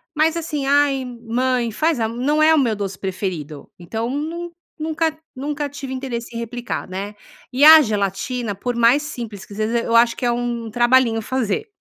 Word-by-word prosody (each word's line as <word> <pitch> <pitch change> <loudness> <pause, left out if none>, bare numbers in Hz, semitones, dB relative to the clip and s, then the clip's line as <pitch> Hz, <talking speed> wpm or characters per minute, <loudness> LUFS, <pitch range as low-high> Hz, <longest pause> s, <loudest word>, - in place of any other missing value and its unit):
mas 315 +2 +2
assim: 300 -4 -3
"Ai, 280 -2 +3
mãe 240 0 -1
faz 310 +4 0
a 225 - +1
m", 230 - -7
não 300 +3 +2
é 315 +1 +6
o - - +4
meu 235 -5 +1
doce 195 -2 -4
preferido. 180 -6 -5
Então 225 +7 -4
nun 325 +5 -4 0.3
nunca 315 0 -1 0.2
nunca 290 +2 -3
tive 270 -2 -7
interesse 240 -3 -5
em - - -3
replicar, 240 +1 -5
né. 200 +3 -5 0.4
E 260 +3 +1
a 315 0 +11
gelatina, 215 +1 -2
por 240 +5 -4
mais 235 +5 +4
simples 225 -8 -7
que 205 - -12
seja, 220 +3 0
eu 230 0 -1
acho 230 0 +5
que - - -3
é 240 - +3
um 235 -1 -3
trabalhinho 240 0 +3
fazer. 260 - -2
245 Hz, 190 wpm, -21 LUFS, 225-285 Hz, 0.4 s, a